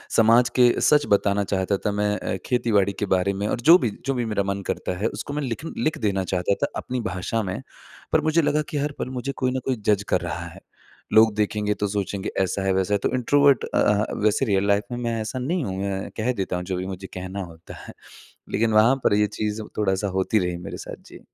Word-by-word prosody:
समाज 115 +2 +5
के 125 -1 +6
सच 150 -1 +4
बताना 100 0 +2
चाहता 95 0 0
था 105 - +2
मैं 105 0 0
अ, - - -3
खेती-बाड़ी 105 -5 +2
के 105 - 0
बारे 95 +2 +1
में 100 +2 -2
और - - -1
जो 165 +7 +8
भी 120 -8 -1 0.2
जो 135 - +1
भी 120 -2 -1
मेरा 105 -2 0
मन 100 0 -2
करता - - -2
है 105 +3 0
उसको 145 - -6
मैं 150 - -2
लिखन 130 +6 -4
लिख 155 - 0
देना 95 -2 0
चाहता 90 +2 0
था - - +3
अपनी 125 0 -3
भाषा 110 +2 -2
में। 95 0 -4 0.5
पर - - +3
मुझे 160 +1 +2
लगा 150 0 +1
कि 150 - -3
हर 145 +1 -1
पल 130 - -3
मुझे 130 +1 -3
कोई 130 -1 0
ना 130 - -1
कोई 130 - +1
जज 100 -1 +3
कर - - +2
रहा - - -4
है। - - -12 0.5
लोग 110 -1 +6
देखेंगे 105 0 0
तो 105 0 -2
सोचेंगे 100 -1 -3
ऐसा 95 +1 -1
है, 95 -1 +1
वैसा 95 +2 0
है - - +4
तो - - 0
इंट्रोवर्ट 140 +2 +4
अ - - +2
अ, 105 +1 +2
वैसे 110 +5 +2
रियल 100 -1 +1
लाइफ़ 100 +2 +2
में - - -3
मैं 115 -1 -1
ऐसा 110 +4 -4
नहीं 160 +5 -1
हूँ, 95 0 -4
मैं 95 -1 -3
कह 115 +3 +1
देता 95 -5 -3
हूँ 90 - -3
जो 95 -1 -2
भी 90 - -3
मुझे 95 0 -6
कहना 95 +1 -5
होता 85 -1 -12
है। - - -9 0.6
लेकिन 110 +1 +1
वहाँ 115 +5 +5
पर - - +3
ये 105 0 +3
चीज़ 105 +1 -3 0.2
थोड़ा-सा 100 -1 0
होती 105 +3 +2
रही 90 -2 -2
मेरे 85 - -7
साथ। - - -9
जी। - - -12
105 Hz, 240 wpm, -24 LUFS, 95-125 Hz, 0.6 s, जो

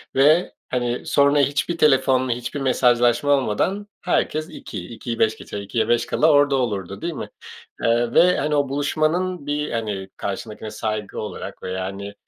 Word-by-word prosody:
Ve, 150 +6 +4 0.2
hani, 120 -1 -2
sonra 140 0 +3
hiçbir 145 +5 +1
telefonla 130 -4 +3
hiçbir 120 +4 -3
mesajlaşma 120 0 +3
olmadan 145 - +1
herkes 155 -3 0
2, 105 - -8
2'yi 115 0 -6
5 110 0 +2
geçe, 100 - -7
2'ye 100 +3 -1
5 120 0 +2
kala 155 +1 +3
orada 145 -1 +4
olurdu, 100 -7 -2
değil 170 +1 -3
mi? - - -6 0.5
Eee, 115 +1 +2
ve, 180 +1 +5
hani, 150 +1 0
o 145 -2 +1
buluşmanın 155 +4 0
bir, 150 0 -2
hani, 105 -4 -3
karşındakine 105 +2 -5
saygı 105 -1 -4
olarak 105 - -7
veya, 95 0 -3
hani, 100 +1 -6
130 Hz, 155 wpm, -22 LUFS, 110-145 Hz, 0.5 s, ve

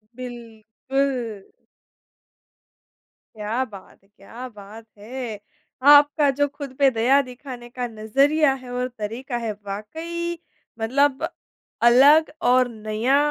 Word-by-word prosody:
बिल्कुल। 240 -1 -4 1.9
क्या 215 +4 -2
बात 195 -2 -13
है! - - -28
क्या 235 +6 -9
बात 210 +1 -12
है। 225 0 -6 0.5
आपका 290 0 +5
जो 285 +2 +1
खुद 280 -2 -9
पे 275 - +6
दया 250 +5 +3
दिखाने 250 -1 -10
का 245 0 -4
नज़रिया 275 +7 +2
है 250 - -11
और 250 0 -1
तरीका 240 +4 -4
है 230 -2 -3
वाक़ई 330 +12 -5 0.4
मतलब, 280 +6 +1 0.5
अलग 280 +7 +6 0.2
और 255 0 +4
नया 220 +4 0
250 Hz, 110 wpm, -23 LUFS, 220-280 Hz, 1.9 s, पे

